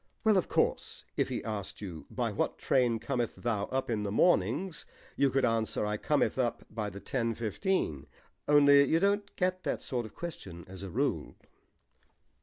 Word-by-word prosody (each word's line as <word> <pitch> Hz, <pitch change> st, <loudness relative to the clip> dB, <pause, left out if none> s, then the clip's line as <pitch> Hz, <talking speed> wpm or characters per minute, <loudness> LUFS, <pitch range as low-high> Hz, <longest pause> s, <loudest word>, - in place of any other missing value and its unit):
"Well, 220 Hz, -2 st, +5 dB
of 185 Hz, -, +2 dB
course, -, -, 0 dB
if -, -, +1 dB
he -, -, -3 dB
asked 100 Hz, -3 st, -5 dB
you, 90 Hz, -6 st, -7 dB
'By -, -, -1 dB
what -, -, -1 dB
train 120 Hz, -3 st, +2 dB
cometh 120 Hz, 0 st, -2 dB
thou 110 Hz, -4 st, -1 dB
up 130 Hz, 0 st, -2 dB
in 110 Hz, -3 st, -1 dB
the 100 Hz, -1 st, -2 dB
mornings?' 150 Hz, -, +2 dB, 0.3 s
you 140 Hz, -, +3 dB
could 135 Hz, 0 st, +2 dB
answer, 115 Hz, -2 st, 0 dB
'I 105 Hz, 0 st, -1 dB
cometh 145 Hz, +2 st, +1 dB
up 120 Hz, -2 st, -1 dB
by 110 Hz, -2 st, -3 dB
the 100 Hz, 0 st, -9 dB
ten 115 Hz, +3 st, -1 dB
fifteen.' 110 Hz, -, -1 dB, 0.4 s
Only 145 Hz, -1 st, +7 dB
you 160 Hz, +4 st, +3 dB
don't 200 Hz, +2 st, +1 dB
get 185 Hz, 0 st, 0 dB
that -, -, -2 dB
sort 120 Hz, -4 st, -3 dB
of -, -, -18 dB
question 95 Hz, -, -7 dB
as 95 Hz, 0 st, -9 dB
a 100 Hz, -, -6 dB
rule." -, -, -1 dB
120 Hz, 180 wpm, -31 LUFS, 105-150 Hz, 0.4 s, Only